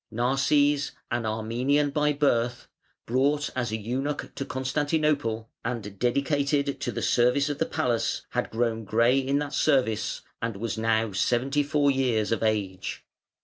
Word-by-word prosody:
Narses, 140 +4 +2 0.2
an 120 -1 -1
Armenian 125 +7 0
by 150 +1 +2
birth, 125 -4 0 0.4
brought 140 +5 +1
as 120 -3 -1
an 110 0 -3
eunuch 135 +6 -3
to - - -4
Constantinople, 140 -4 -1
and 105 -5 -5
dedicated 140 +2 +1
to - - -1
the - - -4
service 125 +4 +3
of 145 -1 -3
the - - +1
palace, 120 -2 -1
had - - -1
grown 115 -1 -1
grey 115 +5 +3
in 135 +1 0
that 145 -1 -3
service, 130 -8 +1 0.2
and 115 -3 -2
was 115 +2 -3
now 110 -1 +1
seventy 125 +8 +1
four 145 0 +2
years 125 -6 +1
of 115 - 0
age. 100 -4 -2
125 Hz, 145 wpm, -26 LUFS, 115-145 Hz, 0.4 s, service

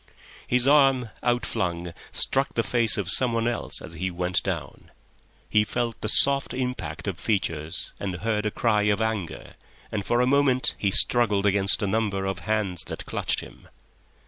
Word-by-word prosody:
His 125 +1 +3
arm, 135 -5 +4
outflung, 90 -8 -1 0.2
struck 135 +1 0
the 115 - +1
face 115 -3 +2
of 95 -3 0
someone 115 -2 +2
else 120 -2 -1
as - - -8
he 90 +3 -3
went 90 0 -1
down; - - -5 0.6
he 105 0 +3
felt 120 +1 -3
the 110 - -1
soft 140 +3 +3
impact 125 - -4
of 95 -4 -3
features 85 -6 -2
and 95 -3 -3
heard 105 +2 -1
a - - +1
cry 105 -1 +1
of 105 0 +2
anger, 110 -6 -3 0.4
and 105 -2 -2
for 120 +4 +1
a 125 - +4
moment 135 -1 +3
he 100 - +1
struggled 105 -1 +3
against 100 +1 +3
a - - +1
number 100 -2 -1
of 95 0 -2
hands 105 -5 -1
that - - -6
clutched - - -1
him. - - -14
110 Hz, 170 wpm, -25 LUFS, 95-120 Hz, 0.6 s, arm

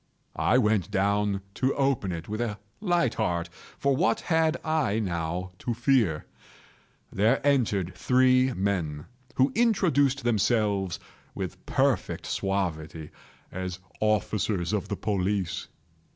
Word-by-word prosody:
I - - +4
went 105 -7 +2
down 100 0 +1
to 130 +4 0
open 135 -9 +1
it 85 -1 -5
with 110 +2 -3
a 110 -4 -2 0.2
light 175 - +1
heart,—for 90 +7 -2
what 175 +8 +1
had 160 -1 +2
I 155 -10 +1
now 90 -2 -2
to 120 - -2
fear? 120 - +2 0.9
There 110 +7 +3
entered 105 -10 +2
three 130 0 +3
men, 90 -8 -2 0.3
who 130 +2 +3
introduced 155 - +2
themselves, 105 -5 +1 0.4
with - - -5
perfect - - 0
suavity, 80 -5 -2 0.4
as 90 -1 -4 0.2
officers 105 -3 0
of 105 - -1
the 100 - -3
police. 95 -2 -1
105 Hz, 115 wpm, -27 LUFS, 95-130 Hz, 0.9 s, I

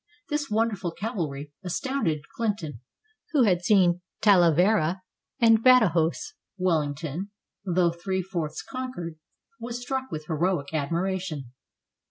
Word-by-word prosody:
This 295 -1 -1
wonderful 210 -4 0
cavalry 155 - -4
astounded 180 - -1
Clinton, 185 - -2 0.5
who 280 -4 +5
had 180 -5 +3
seen 180 -3 +4 0.2
Talavera 185 -1 +4 0.4
and 225 -2 +5
Badajos. 220 - +4 0.2
Wellington, 160 0 -1 0.4
though 180 -2 +2
three 185 +2 -2
fourths 170 -5 -4
conquered, 250 -12 -6 0.4
was 235 +1 -5
struck 265 +1 -3
with 155 -1 -5
heroic 160 -2 -1
admiration. 165 -2 -2
180 Hz, 105 wpm, -26 LUFS, 160-220 Hz, 0.5 s, who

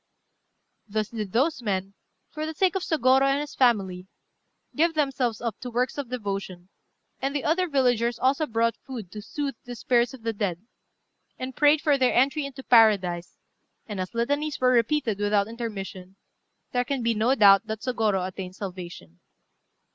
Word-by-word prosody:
Thus 215 0 -2
did 215 -4 -5
those 260 - +1
men, 195 -3 -2 0.4
for 310 +1 -4
the 315 - -6
sake 370 +1 +2
of 385 - -1
Sôgorô 265 -6 +3
and 275 +1 +3
his 295 0 -5
family, 195 -7 +1 0.7
give 325 +2 +2
themselves 270 -6 0
up 230 -3 -3
to 250 - -6
works 245 +2 -1
of 270 -4 -5
devotion; 195 -6 -5 0.5
and 275 +2 -2
the 285 - -1
other 360 +4 +1
villagers 245 -5 +1
also 275 +5 +1
brought 230 0 +1
food 230 -9 -9
to 210 - -7
soothe 275 +6 -4
the 245 0 -7
spirits 240 +1 +1
of 240 - -17
the 225 0 -1
dead, 200 -2 -3 0.7
and 255 0 -6
prayed 295 0 +4
for 290 -3 +2
their 255 -1 +2
entry 275 +3 +2
into 270 -1 -10
paradise; 195 -8 +3 0.5
and 205 -4 -5
as 185 +4 -5
litanies 285 +6 -1
were 255 0 +4
repeated 235 -3 +1
without 205 -1 +2
intermission, 195 -5 -7 0.6
there 245 0 +1
can 260 0 -3
be 230 0 +2
no 225 +5 +2
doubt 200 -2 +6
that 220 -1 -4
Sôgorô 215 -7 0
attained 185 0 -7
salvation. 175 - -8
235 Hz, 170 wpm, -26 LUFS, 200-270 Hz, 0.7 s, doubt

